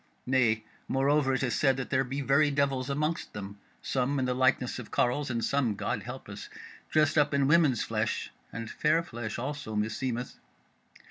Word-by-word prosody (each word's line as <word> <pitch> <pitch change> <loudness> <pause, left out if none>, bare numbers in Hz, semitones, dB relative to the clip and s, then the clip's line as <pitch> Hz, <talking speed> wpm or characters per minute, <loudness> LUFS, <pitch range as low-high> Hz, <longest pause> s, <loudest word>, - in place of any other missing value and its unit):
Nay, 120 -4 +2 0.2
moreover, 135 0 +2
it 135 - -1
is 125 - 0
said 135 -3 +3
that 135 - -5
there 135 -1 +3
be 135 +2 -3
very 140 +2 +4
devils 140 -2 0
amongst 150 +4 -1
them; 100 0 -7 0.2
some 135 +2 0
in 130 - +1
the 125 - 0
likeness 130 0 +2
of 125 - -8
carles, 135 +4 +1
and 115 -2 -1
some 130 -7 +1
(God - - -2
help - - -8
us) - - -8 0.4
dressed 155 0 +3
up 145 0 +2
in 140 -1 +3
women's 150 -5 +4
flesh; 110 0 -2 0.2
and 115 0 -5
fair 155 +7 +2
flesh 120 -9 -5
also, 140 -2 -4
meseemeth. 115 +4 -2
130 Hz, 180 wpm, -29 LUFS, 120-145 Hz, 0.4 s, very